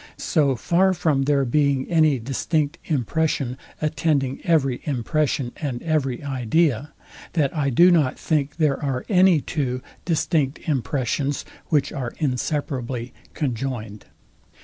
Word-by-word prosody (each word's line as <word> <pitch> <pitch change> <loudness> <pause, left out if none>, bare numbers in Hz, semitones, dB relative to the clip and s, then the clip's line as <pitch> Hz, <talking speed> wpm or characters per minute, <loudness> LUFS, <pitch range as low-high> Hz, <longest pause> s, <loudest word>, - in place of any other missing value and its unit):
So 145 -5 +1
far 185 +8 +2
from 150 -6 +1
there 140 -1 +2
being 140 +1 +1
any 155 -5 +3
distinct 140 +5 -1
impression, 145 -2 0 0.3
attending 150 -3 0
every 135 -7 +2
impression 140 -1 0
and 135 -6 -3
every 145 -6 -1
idea, 140 +1 0 0.4
that 150 -4 +1
I 145 -3 +1
do 175 +8 +6
not 150 -7 +2
think 145 -2 -1
there 150 -4 +1
are 130 -3 -2
any 185 -5 +5
two 130 -5 -2 0.2
distinct 160 -4 0
impressions, 140 0 -1 0.2
which 145 -3 +1
are 125 -3 -4
inseparably 130 -3 -2 0.2
conjoined. 120 -6 -3
140 Hz, 120 wpm, -23 LUFS, 130-155 Hz, 0.4 s, do